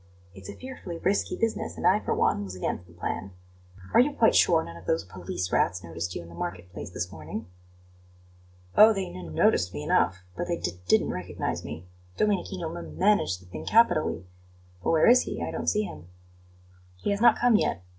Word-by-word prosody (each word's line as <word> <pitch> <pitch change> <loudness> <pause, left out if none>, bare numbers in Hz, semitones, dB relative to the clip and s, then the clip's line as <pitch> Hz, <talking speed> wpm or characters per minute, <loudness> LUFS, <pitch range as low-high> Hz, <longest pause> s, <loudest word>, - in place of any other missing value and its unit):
It's 95 +1 -11
a - - -7
fearfully 255 -10 -8
risky 195 +4 0
business, 225 -1 -2
and - - -4
I, - - +5
for - - -2
one, 100 - +1
was 95 -2 -7
against 90 -1 -3
the 85 - -17
plan. 90 +2 -4 0.6
Are - - +6
you 280 +4 +4
quite 230 -5 +4
sure 165 -2 +4
none 85 - -9
of 85 +2 -13
those 80 0 +1
police 90 0 -5
rats 90 +1 +1
noticed 85 +1 -5
you - - -5
in - - -13
the - - -12
market 90 +1 -6
place 100 - -7
this 90 0 -4
morning?" 80 +8 -7 1.3
"Oh, 220 +1 +8
they 195 -1 -1
n 85 -4 -8
noticed 90 -2 +2
me 75 - -4
enough, 95 +4 +1
but 175 - -3
they 170 -1 -1
d 85 - -2 0.2
didn't - - +3
recognize - - -4
me. 80 +4 -7 0.3
Domenichino 185 -5 -1
m 175 - -8
managed 185 - +2
the - - -17
thing 90 - -8
capitally. 215 - +3 0.6
But - - 0
where 160 -1 +4
is 250 +2 +7
he? - - -4
I - - -3
don't - - -4
see 210 - +1
him." 170 - -8 0.9
"He 205 - -2
has 200 +1 -1
not 235 -1 +6
come 240 -2 +4
yet. 90 - +1
95 Hz, 205 wpm, -27 LUFS, -, 1.3 s, Oh